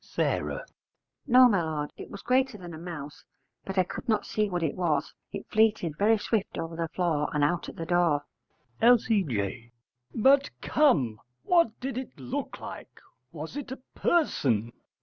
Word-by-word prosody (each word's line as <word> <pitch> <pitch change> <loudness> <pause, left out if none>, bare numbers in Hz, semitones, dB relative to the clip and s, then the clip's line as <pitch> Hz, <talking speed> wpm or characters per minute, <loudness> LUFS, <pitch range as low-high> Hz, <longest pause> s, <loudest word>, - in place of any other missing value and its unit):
S. - - -21 1.1
No, 255 0 +8
my 200 -7 +2
lord, 155 -2 -3
it - - -9
was 200 - -9
greater 255 -2 +2
than 175 -3 -9
a - - -7
mouse, 150 -3 -8 0.4
but 195 0 -6
I 185 - +5
could 235 - -8
not 215 -2 +2
see 215 -1 0
what 175 -2 -2
it 155 - 0
was: 160 -6 -1 0.2
it - - -6
fleeted 215 -8 +2
very 215 +6 +3
swift 215 -1 -2
over 165 0 -4
the 165 0 -2
floor 160 -4 0
and 150 - +2
out 170 +3 0
at - - -10
the 165 - -5
door. 170 -4 +2 0.6
L.C.J. 145 - +2 0.4
But 270 +5 +5
come; 140 - +2 0.2
what 335 -11 +3
did 255 -1 -3
it 260 - -9
look 125 -2 -4
like? - - -9 0.3
Was 160 - -7
it 290 -3 -6
a 260 - -4 0.2
person? 120 - +1
175 Hz, 170 wpm, -28 LUFS, 150-230 Hz, 1.1 s, No